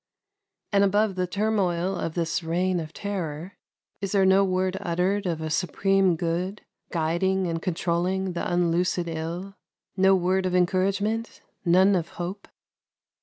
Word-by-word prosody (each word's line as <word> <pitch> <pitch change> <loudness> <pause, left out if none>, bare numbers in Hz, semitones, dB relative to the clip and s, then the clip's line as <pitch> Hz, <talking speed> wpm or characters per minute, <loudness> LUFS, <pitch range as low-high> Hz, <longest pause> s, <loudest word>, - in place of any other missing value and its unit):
And 200 -1 +4
above 205 +1 +2
the 185 -1 -1
turmoil 190 -2 0
of 165 -2 -4
this 165 0 -1
reign 175 +2 0
of 155 -2 -6
terror, 180 -3 -5 0.4
is 195 -1 -3
there 195 -2 +4
no 190 +1 +5
word 185 0 0
uttered 190 +2 0
of 165 -2 -2
a 155 -1 -3
Supreme 190 +2 +2
Good 175 +5 -2 0.3
guiding 180 +3 +1
and 165 -1 -2
controlling 180 +2 -1
the 175 - -3
unloosed 175 +1 +1
ill 170 +4 -5 0.4
no 190 0 +5
word 185 +1 +1
of 180 - -1
encouragement, 200 +5 0 0.2
none 185 +3 +5
of 170 -2 -1
hope? 180 +3 -5
185 Hz, 140 wpm, -25 LUFS, 170-195 Hz, 0.4 s, no